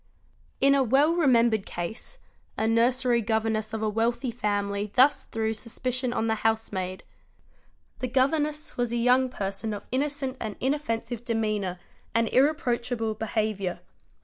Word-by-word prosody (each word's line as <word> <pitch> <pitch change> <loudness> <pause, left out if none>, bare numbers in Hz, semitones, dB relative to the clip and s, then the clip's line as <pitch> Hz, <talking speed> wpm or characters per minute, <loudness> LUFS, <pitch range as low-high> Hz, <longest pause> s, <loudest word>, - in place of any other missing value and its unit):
In 275 +1 +5
a 280 - +4
well 275 +6 +4
remembered 235 - +3
case 175 - -6 0.4
a 220 - +1
nursery 240 +1 +3
governess 220 0 0
of 220 0 -3
a - - +1
wealthy 235 +4 0
family 205 -2 -2
thus 265 +3 +4
threw 220 0 -2
suspicion 250 +3 -3
on 225 - -1
the 220 - +2
housemaid. 205 -4 -1 1.0
'The 255 - -1
governess 295 +4 0
was 245 -1 0
a 240 - 0
young 250 +2 +3
person 200 -1 -3
of 205 - -9
innocent 275 0 -1
and 215 -3 -4
inoffensive 240 -4 -2
demeanour 215 -6 -1 0.4
and 230 0 +3
irreproachable 245 -5 +1
beha: 215 0 -1
viour. 185 -3 -4
230 Hz, 140 wpm, -27 LUFS, 220-260 Hz, 1.0 s, In